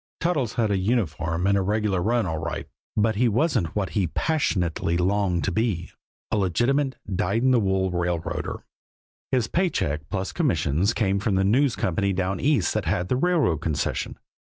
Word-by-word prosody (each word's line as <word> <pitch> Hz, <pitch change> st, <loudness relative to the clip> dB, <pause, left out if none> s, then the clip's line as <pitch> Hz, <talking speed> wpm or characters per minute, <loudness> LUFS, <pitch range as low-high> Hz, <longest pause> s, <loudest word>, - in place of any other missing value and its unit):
Toddles 150 Hz, -10 st, 0 dB
had 110 Hz, -3 st, +1 dB
a 100 Hz, -, +1 dB
uniform 90 Hz, -5 st, 0 dB
and 100 Hz, 0 st, +3 dB
a 100 Hz, -, +2 dB
regular 105 Hz, -1 st, 0 dB
run 115 Hz, +3 st, +1 dB
all 80 Hz, -3 st, -2 dB
right, 80 Hz, -2 st, -4 dB, 0.3 s
but 110 Hz, 0 st, +2 dB
he 125 Hz, +2 st, +3 dB
wasn't 115 Hz, -, +1 dB
what 95 Hz, -6 st, -1 dB
he 95 Hz, +2 st, +1 dB
passionately 90 Hz, -, 0 dB
longed 95 Hz, -1 st, +1 dB
to 100 Hz, -, 0 dB
be 90 Hz, -3 st, -1 dB, 0.4 s
a -, -, +1 dB
legitimate, 120 Hz, -, +1 dB
dyed 100 Hz, +4 st, 0 dB
in 130 Hz, -, +4 dB
the 125 Hz, -, +4 dB
wool 95 Hz, -2 st, +1 dB
railroader. 85 Hz, -1 st, -2 dB, 0.7 s
His 125 Hz, -4 st, +2 dB
pay 180 Hz, +6 st, +1 dB
check, 75 Hz, -, -1 dB
plus 95 Hz, -1 st, -2 dB
commissions, 90 Hz, -, +1 dB
came 100 Hz, -3 st, +1 dB
from 105 Hz, -1 st, 0 dB
the 95 Hz, -, +2 dB
News 125 Hz, +5 st, +3 dB
Company 100 Hz, +2 st, 0 dB
down 95 Hz, +1 st, -1 dB
East 135 Hz, -, +2 dB
that -, -, -1 dB
had 90 Hz, +1 st, -1 dB
the -, -, +2 dB
railroad 155 Hz, -, +2 dB
concession. 80 Hz, -3 st, -2 dB
100 Hz, 175 wpm, -25 LUFS, 90-120 Hz, 0.7 s, in